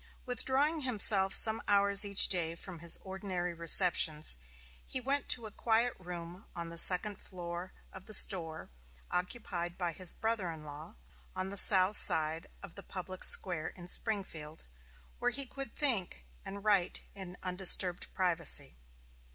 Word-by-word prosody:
Withdrawing 270 +5 -2
himself 205 -6 +2
some 220 0 +3
hours 200 0 +2
each 200 -1 +5
day 165 -3 0
from 175 0 -12
his 170 0 +1
ordinary 190 -2 -7
receptions, 165 - +2 0.5
he 260 - -6
went 275 +3 -4
to 235 - +2
a 215 - -10
quiet 230 +3 -2
room 175 0 -11
on 170 -1 -7
the 170 0 -1
second 195 +3 +6
floor 175 0 -9 0.2
of 190 0 -14
the 215 - -1
store 165 - +2 0.4
occupied 180 -2 -6
by 175 -2 -4
his 180 +1 0
brother 220 -5 -4
in 160 -2 -10
law, 150 0 -12 0.4
on 190 +1 -6
the - - -7
south 190 0 +6
side 160 +1 +2 0.2
of 195 -4 -12
the 200 - -12
public 185 -1 -7
square 175 -4 +4
in 175 -1 -12
Springfield, 175 -8 -4 0.5
where - - -1
he 275 - -5
could 270 -1 -10
think 200 - -2 0.2
and 200 0 -11
write 200 -4 -1
in 185 -2 -11
undisturbed 180 -1 +3
privacy. 170 - -1
185 Hz, 150 wpm, -30 LUFS, 170-210 Hz, 0.5 s, second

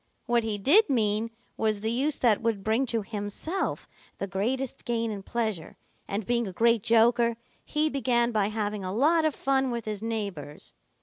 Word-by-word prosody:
What 240 -1 +2
he 220 -2 -1
did 305 - +5
mean 220 -3 +1 0.3
was 215 -2 0
the 220 +1 +1
use 275 +5 +2
that 230 -5 +3
would 225 -4 -1
bring 225 +5 +1
to 230 -2 -1
himself 210 - -4 0.3
the - - -3
greatest 240 +8 -3
gain 230 -2 -1
in 200 -2 -5
pleasure, 215 -6 -3 0.3
and 200 +1 -3
being 235 0 0
a - - -5
great 230 +2 +3
joker, 235 +1 +3 0.3
he 300 +1 0
began 240 -4 +1
by 210 -3 +1
having 210 -1 -3
a 185 - -3
lot 315 - +3
of 310 - +1
fun 270 -1 +1
with 235 -2 -4
his 210 -2 -4
neighbors. 200 -10 -5
230 Hz, 180 wpm, -27 LUFS, 210-245 Hz, 0.3 s, did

